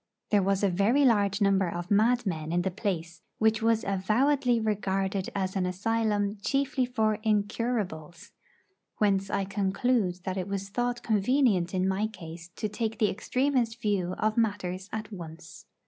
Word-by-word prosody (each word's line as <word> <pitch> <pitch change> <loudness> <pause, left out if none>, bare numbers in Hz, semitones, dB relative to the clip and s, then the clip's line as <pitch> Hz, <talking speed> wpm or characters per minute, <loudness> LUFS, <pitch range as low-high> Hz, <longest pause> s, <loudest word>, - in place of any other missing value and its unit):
There 205 -2 +4
was 195 +1 +1
a - - +5
very 210 +10 +3
large 205 -4 +3
number 195 -2 +3
of 175 +2 -5
madmen 205 -7 +2
in 175 +1 +1
the 190 - -1
place, 175 -4 -3 0.2
which 220 0 +2
was 225 0 +2
avowedly 240 +6 +2
regarded 195 -3 -1
as 190 -1 -2
an 185 -2 0
asylum 205 +1 0
chiefly 275 0 0
for 220 -3 0
'incurables,' 205 -6 -2 0.7
whence 195 -2 +2
I 195 -1 0
conclude 195 -1 0
that 185 0 -3
it 185 - -2
was 195 0 -4
thought 245 +3 -2
convenient 210 -4 +2
in 185 0 +1
my 195 +3 0
case 170 -5 -10
to 215 - -2
take 220 +1 -3
the 215 -4 +2
extremest 250 0 0
view 195 -5 -1
of 215 +1 0
matters 200 -4 -1
at 220 0 -5
once. 165 -3 -10
205 Hz, 155 wpm, -28 LUFS, 185-225 Hz, 0.7 s, a